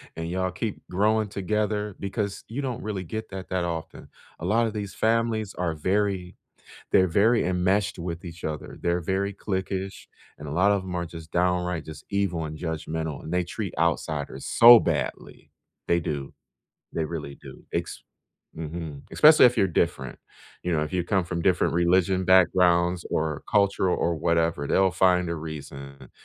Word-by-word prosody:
and 80 0 -4
y'all 95 +1 -1
keep 100 +3 -4
growing 105 +3 +2
together 105 +1 -2
because 100 0 -3
you 120 +7 -4
don't 125 -3 -4
really 105 -3 -4
get 110 +5 -6
that 95 -1 -8
that 95 -1 -1
often. 85 -2 -5 0.3
A 80 - -5
lot 115 +5 +2
of 110 - -5
these 100 -2 -5
families 110 -2 0
are 90 -2 -1
very 95 +2 -1 0.6
they're 95 0 +5
very 110 +7 +3
enmeshed 95 +3 +1
with 85 0 -5
each 85 -1 -9
other. 75 -1 -5
They're 85 0 0
very 95 +4 -1
cliquish, 95 -1 -4 0.3
and 75 - -8
a 70 - -5
lot 90 +6 +3
of 100 -2 +1
them 95 -1 -6
are 85 0 -1
just 80 -1 -10
downright, 90 -1 0
just, 75 -1 -10
evil 100 -5 -1
and 80 0 -6
judgmental, 80 -1 -4
and 80 - -4
they 90 - +2
treat 95 +2 -5
outsiders 75 -4 -1
so 120 0 +9
badly, - - -3 0.4
they 85 - +3
do, 75 -4 -4 0.6
they 80 - 0
really 75 -3 -5
do. - - -12
Ex - - -3 0.5
Mhm. 80 -2 -6
Especially 155 0 +7
if 125 -1 +5
you're 100 - +4
different. 65 -6 -1 0.4
You 90 - -1
know, 75 -2 +1
if 75 - -4
you 90 -2 0
come 95 +1 +1
from 85 -1 -3
different 90 -2 +2
religion 90 +2 +2
backgrounds 90 -1 +4
or 80 -2 -1
cultural 100 -3 +2
or 85 - 0
whatever, 80 -2 0
they'll 95 +5 +3
find 90 -1 +3
a 85 - -2
reason 70 -4 -8
90 Hz, 170 wpm, -26 LUFS, 80-100 Hz, 0.6 s, so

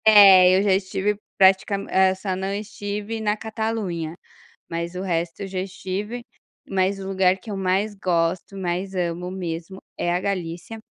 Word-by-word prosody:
É, 190 -4 +9
eu 195 - +2
já 200 -2 +4
estive 190 +2 0 0.2
pratica 195 +1 +5
hã, 190 -1 +2
só 190 0 -3
não 190 +1 -3
estive 210 +1 -4
na 210 0 +1
Catalunha, 215 -7 -3 0.5
mas 170 +1 -4
o 180 - -3
resto 170 -1 -2
eu 200 - -3
já 190 -1 -4
estive, 195 +5 -4 0.4
mas 195 +1 0
o 190 - -6
lugar 190 -1 +3
que 215 +3 -9
eu 200 - -3
mais 195 +3 0
gosto, 180 0 -1
mais 190 +1 -3
amo 175 0 -2
mesmo 175 -1 -5 0.2
é 175 - 0
a 175 - +1
Galícia. 185 +2 -4
190 Hz, 165 wpm, -23 LUFS, 180-205 Hz, 0.5 s, É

